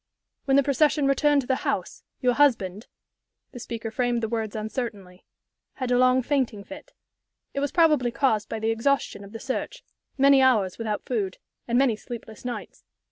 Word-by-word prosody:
"When 270 0 +3
the 280 - +5
procession 285 +1 +2
returned 280 +1 +3
to 245 - -11
the 260 - +1
house, - - -3 0.2
your 250 -2 +3
husband" 225 -8 +1 0.6
the 245 - -9
speaker 230 -1 -6
framed 240 0 0
the - - +1
words 220 -2 -3
uncertainly 215 -5 -5 0.5
"had 255 -2 -4
a 245 - +4
long 255 0 +4
fainting 245 -7 -1
fit. 290 +6 -12 0.6
It 280 - -2
was 285 -1 -1
probably 305 -8 +3
caused 235 -4 0
by 225 - -3
the 220 +1 0
exhaustion 230 -2 0
of 200 - -12
the 225 - -7
search 260 +2 -4 0.3
many 275 0 +6
hours 220 -8 +2
without 215 -2 -3
food 205 -7 -2 0.3
and 240 0 +1
many 260 -4 +3
sleepless 220 -1 -9
nights. 245 -1 -7
245 Hz, 175 wpm, -25 LUFS, 220-275 Hz, 0.6 s, many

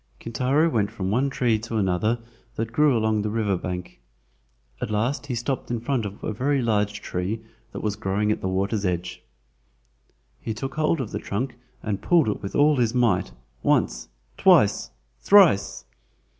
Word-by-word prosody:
Kintaro 130 +7 +1
went 110 -10 +1
from 95 -1 -4
one 130 +6 +1
tree 120 -5 +1
to 115 +1 -4
another 100 +4 +1 0.4
that 115 +1 -3
grew 150 -2 +4
along 110 -1 +1
the 105 - -2
river 105 -3 0
bank. 90 -3 -6 0.8
At - - -2
last 120 +7 -1
he 125 - -2
stopped 125 +3 -3
in 120 -1 -1
front 120 -2 -1
of 100 +1 -11
a - - -2
very 135 +6 0
large 105 -3 0
tree 95 +5 -3 0.3
that - - -7
was 105 -1 -1
growing 105 +1 0
at - - -2
the - - -2
water's 100 +3 -1
edge. 90 -1 -2 1.2
He 110 - -4
took 135 +5 -5
hold 155 0 +1
of 110 - -5
the - - -3
trunk 120 +6 -3 0.3
and 105 -3 -2
pulled 165 -9 +3
it 105 - -3
with 100 - -6
all 150 0 +4
his 120 -1 +1
might, 115 -7 +2 0.3
once, - - +1 0.3
twice, - - +4 0.3
thrice! 190 - +4
110 Hz, 170 wpm, -24 LUFS, 100-130 Hz, 1.2 s, grew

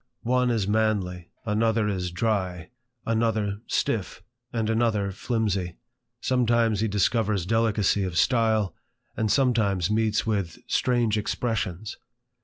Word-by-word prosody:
One 125 +1 +2
is 115 -5 +1
manly^ 100 -5 0 0.2
another 110 0 +1
is 90 -3 -2
dty^ 90 -4 -1 0.4
another 110 -2 0
stiffs 105 -5 -1 0.3
and 115 -2 -1
another 110 -3 +1
^/iwjry/ 100 -4 -1 0.4
sometimes 120 -4 +2
he 110 - +1
discovers 105 -1 +1
delicacy 110 -2 +2
of 90 -3 -2
style, 110 -3 +2 0.4
and 110 -2 0
sometimes 110 - +2
meets 110 0 +1
with 100 -6 -1
strange 120 -4 +1
expressions. 105 -2 -3
110 Hz, 110 wpm, -26 LUFS, 100-115 Hz, 0.4 s, One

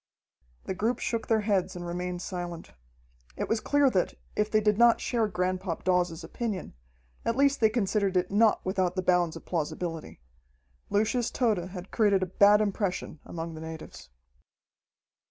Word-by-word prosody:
The - - -3
group 225 +5 0
shook 230 -2 -2
their 220 -1 +3
heads 195 -3 0
and 175 0 -6
remained 180 +1 -4
silent. 175 -3 -6 0.7
It - - -2
was 225 - +1
clear 285 +4 +3
that, 185 -4 0 0.2
if 210 0 +1
they 215 - +3
did 210 0 +1
not 235 -1 +6
share 230 -3 0
Granpop 185 -2 -2
Dawes's 180 -2 +1
opinion, 200 +2 -4 0.5
at 230 - 0
least 280 +1 +3
they 220 - +5
considered 200 -4 0
it 180 +1 0
not 215 +1 +3
without 185 -1 0
the 185 - -1
bounds 175 -2 +2
of - - -10
plausibility. 165 - -4 0.7
Lucius 225 +3 +1
Tode 210 -8 0
had 180 0 -9
created 200 -4 +3
a - - +1
bad 205 +3 +5
impression 195 -6 -2
among 165 0 -5
the 160 - -8
natives. 160 - -9
190 Hz, 160 wpm, -28 LUFS, 180-220 Hz, 0.7 s, not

